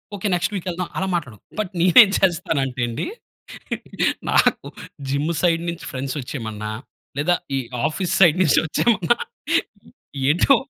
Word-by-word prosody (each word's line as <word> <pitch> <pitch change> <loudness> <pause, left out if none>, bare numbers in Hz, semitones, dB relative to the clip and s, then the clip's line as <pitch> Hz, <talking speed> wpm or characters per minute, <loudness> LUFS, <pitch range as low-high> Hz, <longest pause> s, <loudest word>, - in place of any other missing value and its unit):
Okay 200 +2 -2
next 175 +3 0
week 190 -1 -4
వెళ్దాం. 180 0 -3
అలా 190 - -1
మాట్లాడుకుంటాం. 125 - -5
బట్ 205 -4 -2
నేను 175 0 +3
ఏం 200 - 0
చేస్తానంటే 155 -8 0
అండి 115 - -3 1.2
నాకు - - +3 0.4
జిమ్ 145 +5 0
సైడ్ 170 -2 +2
నుంచి 170 0 -8
ఫ్రెండ్స్ 130 +1 -4
వచ్చేయమన్నా 110 -5 -5 0.5
లేదా 175 +5 +3 0.2
ఈ - - +2 0.3
ఆఫీస్ 175 +3 -2
సైడ్ 170 -3 +7
నుంచి 155 - +4
వచ్చేమన్నా 220 +5 +2 1.1
ఏంటో 180 - +5
170 Hz, 135 wpm, -22 LUFS, 135-180 Hz, 1.2 s, సైడ్